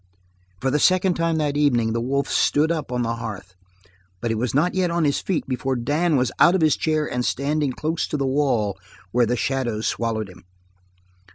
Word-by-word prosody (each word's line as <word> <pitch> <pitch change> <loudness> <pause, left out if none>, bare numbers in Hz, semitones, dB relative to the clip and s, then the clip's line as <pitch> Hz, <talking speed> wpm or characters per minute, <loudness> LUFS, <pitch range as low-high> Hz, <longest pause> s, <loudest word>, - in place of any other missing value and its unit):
For 130 - 0
the 150 - +1
second 185 +3 +3
time 165 -1 0
that 150 -2 0
evening 120 -7 +2
the 115 - -1
wolf 140 +3 -1
stood 155 +3 +2
up 155 -5 -3
on 125 -1 -1
the 115 0 -2
hearth, 100 -5 -7 0.7
but 115 - -2
he - - 0
was 120 +3 -2
not 165 +5 +2
yet 185 -2 +1
on 170 0 0
his 145 -2 +1
feet 185 -5 -2
before 130 0 -1
Dan 150 +7 0
was 130 -2 +1
out 175 - +6
of 190 - +1
his 155 -3 +4
chair 155 -2 0
and 125 -3 -2
standing 145 +2 0
close 160 +5 -2
to - - -2
the 140 - -1
wall, 130 -7 0 0.3
where 120 -1 +2
the 125 +2 0
shadows 120 -5 -1
swallowed 110 -2 -1
him. 90 -2 -15
135 Hz, 205 wpm, -23 LUFS, 120-155 Hz, 0.7 s, out